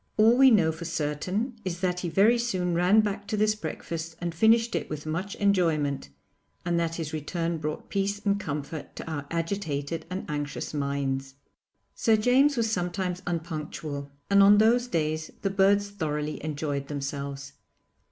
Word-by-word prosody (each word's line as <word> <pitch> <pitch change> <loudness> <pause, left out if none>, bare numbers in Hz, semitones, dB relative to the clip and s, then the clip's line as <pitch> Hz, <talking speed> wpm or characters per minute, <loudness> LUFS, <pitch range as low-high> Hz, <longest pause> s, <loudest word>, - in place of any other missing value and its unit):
All 220 +2 +6
we 265 +1 +7
know 185 -9 +4
for 160 +2 -8
certain 175 - -2
is 180 -2 -3
that 180 -1 0
he 175 - -3
very 215 +7 +4
soon 185 -7 -1
ran 180 +5 +5
back 205 -1 -3
to 215 - -2
this 215 0 +3
breakfast 165 -3 -5
and 175 -1 -3
finished 225 +5 +4
it - - -2
with 150 0 -5
much 175 +6 -3
enjoyment, 160 - +1 0.6
and 170 -1 +1
that 165 -1 -1
his 160 -2 -4
return 165 +2 -2
brought 150 0 -4
peace 200 0 0
and 200 0 +2
comfort 150 -2 -5
to - - -7
our 145 -3 -4
agitated 165 -3 -3
and 185 +1 -4
anxious 145 -1 -4
minds. 135 -2 -2 0.6
Sir 225 - +3
James 260 +5 +4
was 225 -1 +1
sometimes 180 -1 -2
unpunctual, 155 -4 -4 0.2
and 200 0 +5
on 200 +1 +8
those 235 +3 +4
days 155 -5 -1
the 195 - +1
birds 200 +1 +3
thoroughly 150 -5 -3
enjoyed 145 -2 -3
themelves. 140 -1 -5
170 Hz, 160 wpm, -27 LUFS, 150-200 Hz, 0.6 s, on